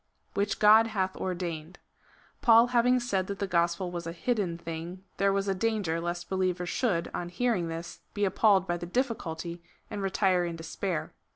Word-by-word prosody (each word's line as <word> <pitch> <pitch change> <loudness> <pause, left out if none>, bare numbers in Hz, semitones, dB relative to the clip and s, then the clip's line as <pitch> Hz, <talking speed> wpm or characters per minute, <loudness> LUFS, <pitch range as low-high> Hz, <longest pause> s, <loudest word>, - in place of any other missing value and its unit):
Which 200 0 0
God 220 +2 +7
hath 190 -4 -1
ordained. 175 -2 -4 0.6
Paul 230 0 +7
having 250 +1 +4
said 195 -6 -1
that 200 - -4
the 200 - -1
gospel 175 0 0
was 170 -1 -5
a - - -3
hidden 185 -2 -1
thing, 170 +2 -7
there 195 0 +3
was 195 0 0
a 195 - +2
danger 190 -5 -1
lest 175 0 -3
believers 185 -2 -1
should, 195 -10 0
on 175 - -3
hearing 200 -2 0
this, 165 +1 -6 0.2
be 205 0 +1
appalled 195 0 +4
by 175 - 0
the 175 0 -6
difficulty, 175 -7 -2 0.3
and 205 -2 -4
retire 190 -2 +2
in 170 -1 -3
despair. 165 +1 -4
185 Hz, 175 wpm, -29 LUFS, 170-205 Hz, 0.6 s, God